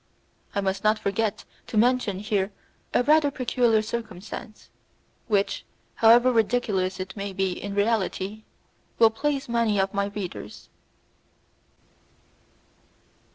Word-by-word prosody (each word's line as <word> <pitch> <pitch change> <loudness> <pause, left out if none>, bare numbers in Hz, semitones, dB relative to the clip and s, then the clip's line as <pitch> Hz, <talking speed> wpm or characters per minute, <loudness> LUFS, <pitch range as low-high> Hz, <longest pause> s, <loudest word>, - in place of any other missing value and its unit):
I 200 - +1
must 195 +1 -2
not 215 +1 +4
forget 215 +1 -2 0.2
to 220 - -3
mention 240 -3 +2
here 205 -1 -1 0.4
a - - +2
rather 300 +1 +4
peculiar 240 -4 +1
circumstance, 215 -2 -7 0.6
which, 205 -3 0 0.3
however 240 +3 +6
ridiculous 210 -5 +1
it 185 0 -6
may 200 -1 -5
be 190 0 0
in 200 +2 -5
reality, 205 -1 0 0.6
will 225 -1 +6
please 280 +4 -2
many 230 -3 +1
of 195 0 0
my 200 0 +1
readers. 200 - -7
215 Hz, 110 wpm, -25 LUFS, 195-235 Hz, 0.6 s, however